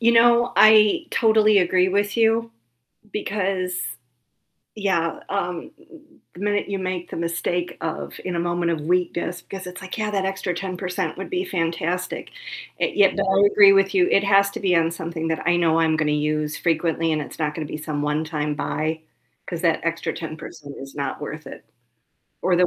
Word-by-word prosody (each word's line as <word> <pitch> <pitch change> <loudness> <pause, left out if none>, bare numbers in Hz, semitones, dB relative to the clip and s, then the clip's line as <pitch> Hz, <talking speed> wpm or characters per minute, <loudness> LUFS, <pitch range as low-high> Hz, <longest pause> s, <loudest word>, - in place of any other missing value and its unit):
You 235 0 +4
know, 235 +1 +5
I 215 - +6
totally 215 -3 +4
agree 180 +1 +3
with 205 +2 0
you 230 0 +2 0.6
because 185 -3 -2 1.0
yeah, 180 -5 0
um, 180 -3 -3 0.6
the 180 - -11
minute 205 0 0
you 195 -1 -2
make 185 -1 -4
the - - -6
mistake 170 +1 -2
of 160 -1 -4
in 180 -1 -3
a 170 - 0
moment 175 0 0
of 160 - -2
weakness, 175 +1 -1
because 185 0 -8
it's, 180 +2 -9
like, 190 0 -7
"Yeah, 215 -1 -1
that 195 -2 -1
extra 190 -1 -2
10% 180 -1 -3
would 195 - -7
be 370 0 -1
fantastic," 170 - -2 0.5
yet, 200 -2 +3
but 200 - +1
I 195 +1 +4
agree 200 -1 +8
with 195 0 +3
you, 180 -2 +4
it 195 - +3
has 200 0 +4
to - - -6
be 185 -2 +2
on 165 0 +2
something 165 -1 -4
that 160 +1 -2
I 175 0 +4
know 165 -2 +2
I'm 160 -1 +3
gonna 155 -1 +1
use 150 0 -1
frequently 165 -1 0
and 155 - 0
it's - - -10
not 150 -2 -1
gonna 160 -2 -4
be - - -5
some 150 -1 -4
one-time 150 0 -1
buy 160 +1 -2 0.4
'cause 170 -2 -4
that 165 -2 +3
extra 165 0 -1
10% 155 -2 -8
is 135 0 -10
not 140 - -3
worth - - -7
it. - - -10 0.8
Or 180 -1 +3
the 180 - +4
180 Hz, 185 wpm, -23 LUFS, 165-195 Hz, 1.0 s, agree